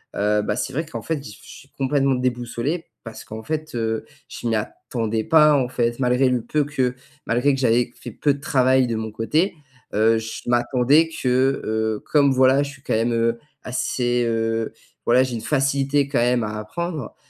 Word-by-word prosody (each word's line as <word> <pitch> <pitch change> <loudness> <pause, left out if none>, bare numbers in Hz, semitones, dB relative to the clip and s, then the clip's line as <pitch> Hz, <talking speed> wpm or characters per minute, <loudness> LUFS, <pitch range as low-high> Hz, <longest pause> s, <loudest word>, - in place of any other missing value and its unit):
Heu, 105 +1 +2
bah, 105 - -1
c'est 130 - -3
vrai 160 +5 -2
qu'en 160 - -7
fait, 160 -4 -3
j 105 -7 -11
je - - -15
suis 140 - -13
complètement 135 0 +1
déboussolé 125 +5 -2 0.2
parce 115 -2 -9
qu'en 110 +1 -8
fait, 155 0 -4
heu, 110 -1 -1 0.2
je - - -6
m'y 115 - +1
attendais 110 +1 -3
pas, 150 -2 +5
en 125 -2 0
fait, 120 -1 -1
malgré 125 +1 +3
le 125 -1 0
peu 145 +5 0
que 130 -4 -1 0.3
malgré 125 +5 +2
que 135 - -2
j'avais 120 -1 +2
fait 120 - -9
peu 145 +6 +1
de 140 - -9
travail 130 -2 +3
de 115 - -2
mon 110 0 -4
côté, 155 - 0 0.4
heu, 110 +2 +3
je 110 0 -5
m'attendais 125 +6 +3
que, 130 -2 +1
heu, 110 0 -1
comme 140 -2 +5
voilà, 130 +2 +4
je 140 - -5
suis 135 -2 -15
quand - - -2
même, 115 +2 +1
heu, 115 0 +1 0.2
assez, 120 -1 0
heu, 115 0 -1 0.3
voilà, 125 +2 +5
j'ai 125 -2 -3
une 115 - -4
facilité 140 0 +1
quand 135 - +1
même 120 0 +2
à 105 0 -4
apprendre, 160 +4 -5
125 Hz, 200 wpm, -22 LUFS, 115-140 Hz, 0.4 s, pas